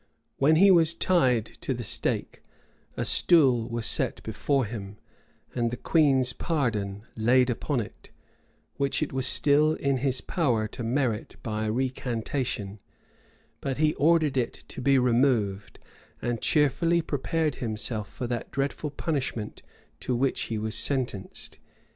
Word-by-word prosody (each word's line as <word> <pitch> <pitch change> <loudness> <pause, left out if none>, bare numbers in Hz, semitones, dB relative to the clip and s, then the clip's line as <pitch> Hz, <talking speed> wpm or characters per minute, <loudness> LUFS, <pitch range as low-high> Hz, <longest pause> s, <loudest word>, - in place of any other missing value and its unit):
When 150 +3 +4
he 195 +4 +6
was 165 -2 +4
tied 130 - +2 0.2
to 130 - -2
the 120 - -5
stake, 100 - -2 0.6
a - - -1
stool 130 -9 +4
was 115 -1 -3
set - - +1
before 140 -3 0
him, 105 -2 -7 0.6
and 120 -2 0
the 120 - -5
queen's 135 -6 +2
pardon 110 - -2
laid 125 +3 +3
upon 125 +2 -1
it, 105 - -11 0.7
which 140 +2 0
it 150 - -5
was 130 -1 0
still 150 +3 +3
in 140 -1 0
his 130 0 0
power 120 - 0
to 120 - -8
merit 120 -2 -1
by 110 -1 -2
a 110 - 0
recantation; 125 -3 -3 0.8
but 135 -2 -3
he 155 +1 +2
ordered 155 -2 +2
it 120 -2 -2
to - - -7
be 135 +1 +4
removed, 120 -6 +1 0.4
and 120 -2 -3
cheerfully 165 +3 +2
prepared 155 +1 -1
himself 110 -2 -3
for 125 - -5
that 120 -1 -4
dreadful 140 +2 -2
punishment 140 -8 -3 0.4
to 125 - -2
which 130 +2 0
he 115 - -2
was 110 0 -3
sentenced. 120 -4 -1
130 Hz, 140 wpm, -27 LUFS, 115-145 Hz, 0.8 s, he